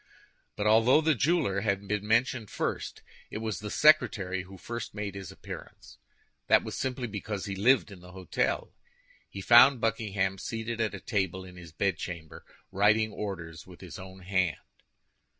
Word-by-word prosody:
But 105 Hz, -, -3 dB
although 115 Hz, +7 st, +5 dB
the 160 Hz, 0 st, +3 dB
jeweler 135 Hz, -, +1 dB
had 100 Hz, -2 st, -1 dB
been 105 Hz, 0 st, -2 dB
mentioned 115 Hz, -1 st, +1 dB
first, -, -, -4 dB, 0.3 s
it -, -, -5 dB
was 110 Hz, -1 st, -3 dB
the 105 Hz, 0 st, -6 dB
secretary 100 Hz, -11 st, +3 dB
who 95 Hz, +1 st, -12 dB
first 120 Hz, +1 st, -6 dB
made 105 Hz, -2 st, -4 dB
his 95 Hz, -3 st, -8 dB
appearance. -, -, -11 dB, 0.5 s
This -, -, +5 dB
was -, -, -6 dB
simply 130 Hz, -1 st, -2 dB
because 105 Hz, -2 st, -5 dB
he 100 Hz, -, -4 dB
lived 115 Hz, +2 st, +3 dB
in 95 Hz, -, -11 dB
the 90 Hz, 0 st, -13 dB
hôtel. 95 Hz, -3 st, -2 dB, 0.6 s
He 100 Hz, -, -7 dB
found 120 Hz, +5 st, +7 dB
Buckingham 105 Hz, -4 st, -1 dB
seated 115 Hz, +1 st, -4 dB
at 110 Hz, -, -1 dB
a -, -, -7 dB
table 95 Hz, -2 st, -2 dB
in 90 Hz, -1 st, -12 dB
his 85 Hz, -2 st, -11 dB
bedchamber, 85 Hz, -2 st, -3 dB, 0.3 s
writing 105 Hz, +2 st, +3 dB
orders 85 Hz, -7 st, -6 dB
with 90 Hz, -2 st, -14 dB
his 90 Hz, -2 st, -9 dB
own 95 Hz, 0 st, -11 dB
hand. 95 Hz, -2 st, 0 dB
100 Hz, 165 wpm, -29 LUFS, 95-115 Hz, 0.6 s, found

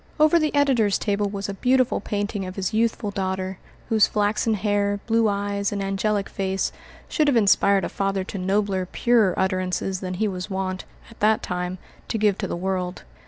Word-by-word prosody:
Over 310 Hz, +2 st, +5 dB
the 305 Hz, -2 st, 0 dB
editor's 255 Hz, -8 st, +3 dB
table 205 Hz, -1 st, 0 dB
was 200 Hz, 0 st, -4 dB
a 200 Hz, -, -3 dB
beautiful 255 Hz, +4 st, +2 dB
painting 205 Hz, 0 st, -3 dB
of 185 Hz, -, -7 dB
his 195 Hz, +2 st, -2 dB
youthful 220 Hz, -2 st, 0 dB
daughter, 190 Hz, -1 st, -3 dB, 0.3 s
whose 220 Hz, -2 st, +5 dB
flaxen 215 Hz, +1 st, +1 dB
hair, 205 Hz, 0 st, 0 dB
blue 225 Hz, -1 st, +3 dB
eyes, 200 Hz, 0 st, -1 dB
and 205 Hz, -, -2 dB
angelic 195 Hz, +1 st, 0 dB
face 190 Hz, 0 st, -2 dB, 0.4 s
should 305 Hz, -2 st, +1 dB
have 275 Hz, -4 st, +4 dB
inspired 200 Hz, -3 st, +4 dB
a -, -, -3 dB
father 195 Hz, -1 st, -1 dB
to 195 Hz, +1 st, -6 dB
nobler, 190 Hz, 0 st, 0 dB
purer, 230 Hz, -7 st, +3 dB
utterances 185 Hz, 0 st, -1 dB
than 185 Hz, -1 st, -4 dB
he 215 Hz, +4 st, 0 dB
was 185 Hz, 0 st, -4 dB
wont, 190 Hz, -1 st, -3 dB, 0.3 s
at 230 Hz, -, -17 dB
that 215 Hz, +1 st, +3 dB
time, 180 Hz, 0 st, -3 dB, 0.3 s
to -, -, -1 dB
give 210 Hz, -2 st, +2 dB
to 195 Hz, -, -2 dB
the 170 Hz, -, -3 dB
world. 185 Hz, 0 st, -3 dB
200 Hz, 185 wpm, -24 LUFS, 190-215 Hz, 0.4 s, Over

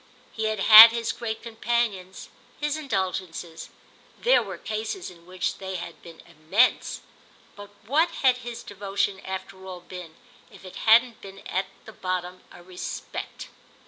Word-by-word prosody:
He 220 Hz, -, -4 dB
had 215 Hz, -2 st, -1 dB
had 220 Hz, +2 st, +11 dB
his 230 Hz, -1 st, -2 dB
great 220 Hz, -2 st, -5 dB
companions, 225 Hz, -5 st, -3 dB, 0.3 s
his 295 Hz, 0 st, -1 dB
indulgences—there 190 Hz, -, -3 dB
were -, -, -7 dB
cases 220 Hz, -, -5 dB
in 170 Hz, -1 st, -19 dB
which 185 Hz, 0 st, -3 dB
they 190 Hz, -1 st, -6 dB
had 175 Hz, -, -8 dB
been 165 Hz, -2 st, -13 dB
immense; 170 Hz, +9 st, +1 dB, 0.5 s
but 205 Hz, 0 st, -11 dB, 0.2 s
what 310 Hz, +9 st, +2 dB
had 260 Hz, -6 st, +2 dB
his 240 Hz, -2 st, -8 dB
devotion 200 Hz, -1 st, -3 dB
after 190 Hz, 0 st, -7 dB
all 185 Hz, -1 st, -7 dB
been 175 Hz, -3 st, -10 dB, 0.3 s
if -, -, -16 dB
it 185 Hz, -, -11 dB
hadn't 235 Hz, +1 st, +5 dB
been 195 Hz, 0 st, -12 dB
at 190 Hz, +1 st, -2 dB, 0.3 s
bottom 185 Hz, 0 st, -3 dB
a 175 Hz, -, -14 dB
respect? 180 Hz, 0 st, -7 dB
195 Hz, 140 wpm, -25 LUFS, 185-230 Hz, 0.5 s, had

